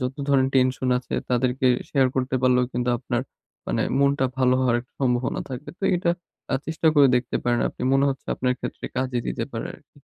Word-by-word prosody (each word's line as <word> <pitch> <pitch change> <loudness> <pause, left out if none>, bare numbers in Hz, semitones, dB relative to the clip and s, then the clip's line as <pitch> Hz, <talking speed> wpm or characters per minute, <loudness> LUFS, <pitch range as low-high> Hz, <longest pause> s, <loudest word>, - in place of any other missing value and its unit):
যত 125 +1 -3
ধরনের 135 -1 +3
টেনশন 130 0 +2
আছে 125 - -6 0.2
তাদেরকে 125 +1 +1 0.2
শেয়ার 135 -3 +3
করতে 130 0 0
পারলেও 125 -1 +4
কিন্তু 125 0 0
আপনার 120 0 -2 0.4
মানে - - 0 0.2
মনটা 140 -1 +3
ভালো 130 -1 +4
হওয়ার 125 -2 +3
একটা 120 - -20
সম্ভাবনা 125 -1 0
থাকবে। 130 +3 -6
তো 195 - -4
এটা 170 -1 +1 0.4
আ - - +3
চেষ্টা 160 0 -2
করে 145 -3 +7
দেখতে 125 0 -1
পারেন 120 -1 +2
আপনি। - - -9
মনে 135 +1 +4
হচ্ছে 135 - -7
আপনার 125 0 0
ক্ষেত্রে - - -6
কাজে 130 -1 -1
দিতে - - -2
পারে - - -3
আরকি। - - -21
130 Hz, 195 wpm, -24 LUFS, 125-135 Hz, 0.4 s, করে